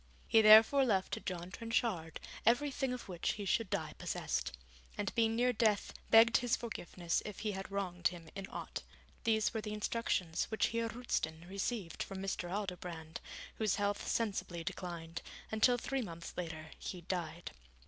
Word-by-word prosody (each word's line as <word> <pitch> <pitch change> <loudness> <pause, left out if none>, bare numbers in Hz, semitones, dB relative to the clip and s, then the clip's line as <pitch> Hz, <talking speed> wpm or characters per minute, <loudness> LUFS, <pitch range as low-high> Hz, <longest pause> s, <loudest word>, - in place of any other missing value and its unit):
He 225 - +6
therefore 220 +6 +9
left 195 -7 +2
to - - -1
John 180 -1 -5
Trenchard 225 -7 -1 0.2
everything 270 +3 +2
of 250 -1 -5
which 175 -3 -1
he 205 - -5
should 215 +1 +1
die 160 -7 -2
possessed, 65 0 -1 0.5
and 205 -1 -1
being 225 -1 +3
near 250 +1 +3
death 215 -2 +2 0.2
begged 230 +1 +8
his 245 -1 +2
forgiveness 175 -7 -2
if 210 -3 -7
he 215 -1 0
had 195 -1 -5
wronged 185 -3 0
him 170 -2 -7
in 195 -1 -5
aught. - - -5 0.4
These 220 -2 +3
were 220 - -1
the 210 0 -4
instructions 205 -6 0
which 220 - +1
Heer 230 0 0
Roosten 170 -9 -2
received 195 -1 -3
from 195 - -4
Mr. 190 -2 -2
Aldobrand, 180 -5 -4 0.4
whose 215 -3 +2
health 205 0 -1
sensibly 195 -6 -1
declined, 165 -1 -5 0.3
until 230 +3 +4
three 270 +2 -1
months 170 -6 -7
later 160 -3 -5
he 180 - -5
died. 170 -1 -4
200 Hz, 160 wpm, -35 LUFS, 175-225 Hz, 0.5 s, therefore